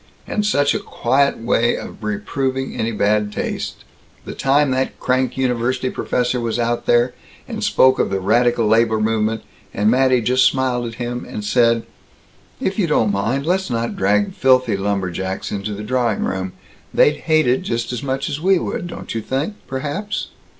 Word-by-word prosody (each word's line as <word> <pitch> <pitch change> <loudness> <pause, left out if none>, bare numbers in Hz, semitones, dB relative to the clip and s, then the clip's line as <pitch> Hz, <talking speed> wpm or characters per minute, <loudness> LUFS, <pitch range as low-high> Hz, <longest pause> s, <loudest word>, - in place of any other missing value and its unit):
And 210 - -1
such 145 -9 +2
a - - -1
quiet 140 +4 +1
way 115 0 +1
of - - -9
reproving 130 +5 -2
any 115 +1 -1
bad 105 0 +1
taste - - -4 0.4
the - - -6
time 140 +1 +2
that 130 +1 -1
crank 130 +1 0
university 130 0 0
professor 125 0 -1
was 115 0 -1
out 120 0 -1
there, 120 +1 +3 0.3
and - - -5
spoke 130 0 +4
of - - +2
the 95 - -1
radical 120 +4 +2
labor 110 0 +3
movement, 110 0 0 0.3
and 105 +2 +3
Mattie 130 0 +3
just 125 +3 +3
smiled 125 -2 +1
at 115 - -7
him 120 0 -4
and 105 - -6
said, 115 +1 +3 0.8
'If 190 +3 -2
you 185 - +2
don't 115 -9 +2
mind, 115 +8 -1
let's 185 +1 0
not 115 -1 -2
drag 100 +1 +1
filthy 130 -4 +3
lumberjacks 95 -1 -2
into 100 +1 -3
the 105 - -6
drawing 120 -2 0
room 95 0 -3 0.4
they'd 150 - +4
hate 155 -1 +2
it 125 +1 +2
just 120 +1 -2
as 120 - -3
much 135 0 -2
as 145 - -4
we 190 +2 +4
would, 175 - -3
don't - - -7
you 115 - -2
think, 135 - -2
perhaps?'" 150 +11 -3
120 Hz, 175 wpm, -20 LUFS, 110-130 Hz, 0.8 s, spoke